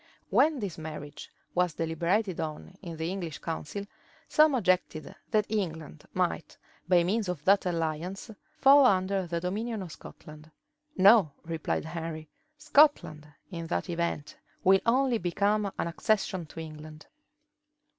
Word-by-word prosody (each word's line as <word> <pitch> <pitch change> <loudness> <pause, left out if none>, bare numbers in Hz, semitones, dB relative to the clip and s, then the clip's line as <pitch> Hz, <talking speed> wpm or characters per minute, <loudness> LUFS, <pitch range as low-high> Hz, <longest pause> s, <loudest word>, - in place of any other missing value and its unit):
When 310 -1 +4
this 200 -9 -5
marriage 150 -2 -8 0.2
was 180 -3 +1
deliberated 170 +4 -1
on 160 +3 -5
in 170 -4 -7
the 160 +2 -2
English 175 -6 -5
council, 165 +4 -5 0.4
some 305 -2 +4
objected, 185 -7 0 0.2
that 215 -2 +2
England 165 - -4
might, - - -2 0.3
by 175 -2 +5
means 200 +2 0
of 160 -5 -5
that 195 -1 +4
alliance, 170 +5 -3 0.3
fall 275 -2 +7
under 190 -2 +1
the 170 0 -2
dominion 210 +4 -3
of 175 - -9
Scotland. 155 0 -12 0.5
"No," 195 -5 +6
replied 165 -1 -2
Henry, 160 -1 -6 0.3
"Scotland, 295 - +3 0.2
in 165 -2 -5
that 175 - -2
event, 170 -3 -3 0.3
will 195 +1 +6
only 250 0 +3
become 200 +3 0
an - - -1
accession 185 -1 -1
to 165 - -10
England." 155 -1 -9
180 Hz, 135 wpm, -28 LUFS, 160-205 Hz, 0.5 s, fall